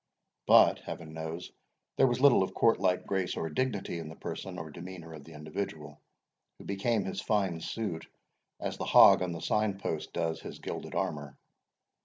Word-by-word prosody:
But, - - +7
Heaven 80 -1 -8
knows, 80 +2 -6 0.4
there 135 - +5
was 120 0 0
little 135 -6 +6
of 95 - -2
courtlike 95 -5 +2
grace 95 -2 -1
or 80 - -3
dignity 100 -4 -2
in 80 -1 -7
the 80 - -9
person 95 -2 -6
or 80 -2 -7
demeanour 85 0 -9
of 75 -2 -11
the 80 - -12
individual, 75 +6 -6 0.6
who - - -13
became 100 +2 0
his 95 - -4
fine 95 -6 0
suit 95 -4 -4 0.5
as - - -4
the - - -3
hog - - +8
on 90 -1 -1
the 85 -1 -6
sign 105 0 0
post - - -4
does 80 -1 -2
his - - -8
gilded - - -6
armour. 75 -2 -3
90 Hz, 175 wpm, -30 LUFS, 80-100 Hz, 0.6 s, hog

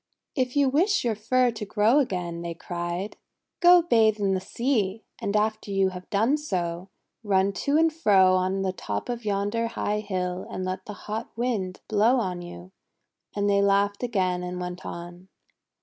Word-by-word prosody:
"If 255 -1 -1
you 285 -1 +4
wish 360 +10 +2
your 235 -2 +1
fur 245 +4 +2
to 225 -2 -6
grow 215 +6 +3
again," 180 -9 -2
they 170 -1 -5
cried, 175 +3 -4 0.4
:<go 350 0 +7
bathe 220 -8 +3
in 195 -1 +1
the 185 - -1
sea; 220 -1 -1 0.2
and 200 - -2
after 215 0 -1
you 195 -1 +2
have 180 -1 -10
done 225 +8 +2
so, 180 - -3 0.3
run 195 -1 +2
to 280 +10 0
and 325 0 +3
fro 195 - +4
on 185 +1 +1
the 190 -1 -1
top 105 - -4
of 240 -2 -4
yonder 205 +3 0
high 210 -2 -2
hill 185 -3 -3
and 185 - -4
let 185 0 -4
the 210 - -5
hot 220 +2 -4
Wind 215 -7 -2
blow 220 +4 +3
on 185 -8 -1
you!'1 175 +1 -10 0.6
And 205 0 0
they 200 0 +3
laughed 200 0 +2
again 185 -7 0
and 180 0 -5
went 180 0 -6
on. 175 +2 -8
200 Hz, 180 wpm, -26 LUFS, 185-230 Hz, 0.6 s, <go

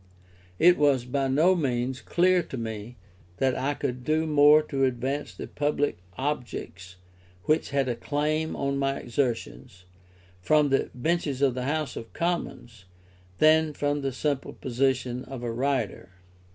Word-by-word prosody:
It 175 0 +5
was 140 -4 +3
by 135 +2 -1
no 160 +8 +4
means 130 -4 -1
clear 180 +1 +3
to 135 - -7
me 110 0 -6 0.4
that 130 -1 +1
I 140 +3 -1
could 125 -3 -3
do 155 +4 +1
more 150 0 +6
to 135 -3 -2
advance 130 +3 -2
the - - -8
public 145 -6 -1 0.2
objects 115 - -4 0.5
which 155 +1 +1
had 140 -2 0
a 120 - -1
claim 150 +5 -1
on 140 0 -1
my 135 0 0
exertions, 120 -7 -3 0.6
from 150 +7 +3
the 135 - +1
benches 145 0 -1
of 135 -3 +3
the 125 0 -4
House 150 -2 -2
of 115 - -8
Commons, 120 - -3 0.5
than 155 0 +4
from 145 0 -1
the 135 -1 -1
simple 140 +1 -2
position 125 -1 -1
of 130 -2 -8
a 120 - -2
writer. 120 -7 -2
135 Hz, 150 wpm, -26 LUFS, 125-150 Hz, 0.6 s, more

